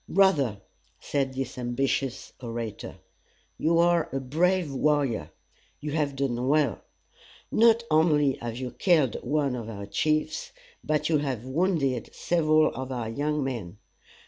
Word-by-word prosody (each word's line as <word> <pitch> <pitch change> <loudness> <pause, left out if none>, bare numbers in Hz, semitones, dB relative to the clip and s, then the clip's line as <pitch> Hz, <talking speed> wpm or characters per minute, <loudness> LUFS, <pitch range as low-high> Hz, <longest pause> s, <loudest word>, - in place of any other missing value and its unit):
"Brother," 145 - +3 0.4
said 135 -2 -2
this 130 -1 -4
ambitious 130 +1 -2
orator, 115 -3 -5 0.6
"you 165 +1 +2
are 170 -1 +3
a 135 - -1
brave 165 +4 +1
warrior. 140 -5 +1 0.5
You 150 - -5
have 145 -2 0
done 130 -2 -1
well. 150 +1 +2 0.7
Not 230 +1 +5
only 150 -3 +4
have 115 0 -5
you 125 -1 -4
killed 155 - +2
one 140 0 0
of 115 -2 -6
our 100 -2 -6
chiefs, 155 +9 -1 0.3
but 150 -1 0
you 155 -2 +3
have 130 -5 -3
wounded 140 - 0
several 155 -2 +3
of 130 0 -5
our 120 -3 -3
young 150 +4 -1
men. 115 -9 -5
140 Hz, 135 wpm, -27 LUFS, 125-155 Hz, 0.7 s, Not